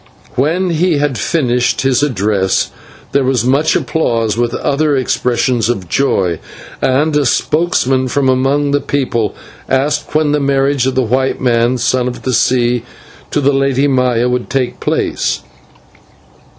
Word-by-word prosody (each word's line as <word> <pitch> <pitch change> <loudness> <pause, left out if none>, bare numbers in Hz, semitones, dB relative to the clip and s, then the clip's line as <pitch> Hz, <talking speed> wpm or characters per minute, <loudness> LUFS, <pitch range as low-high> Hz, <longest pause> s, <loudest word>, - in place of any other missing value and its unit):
When 170 +7 0
he 170 0 +1
had 145 -2 0
finished 125 - 0
his 135 -1 +2
address 100 -8 0 0.4
there 140 - +2
was 130 -3 0
much 140 +5 +2
applause 115 -9 0
and 120 0 0
other 145 +1 0
expressions 125 -2 0
of 95 -7 -2
joy, 90 -6 0 0.4
and 145 +4 +1
a 150 - +3
spokesman 135 -2 +1
from 135 +1 0
among 135 +3 +1
the 145 0 +1
people 125 -7 -1 0.3
asked 145 +3 0
when 155 -1 +2
the 150 - +1
marriage 140 -1 +1
of 130 - -1
the 130 - +2
white 130 +3 0
man, 120 0 +1
Son 125 +1 0
of 125 - -6
the 130 - -1
Sea, 120 +1 +2 0.5
to - - 0
the 140 0 +2
Lady 135 0 +1
Maya, 125 -3 +1
would 125 0 -2
take 130 -3 -2
place. - - -1
130 Hz, 150 wpm, -14 LUFS, 120-145 Hz, 0.5 s, a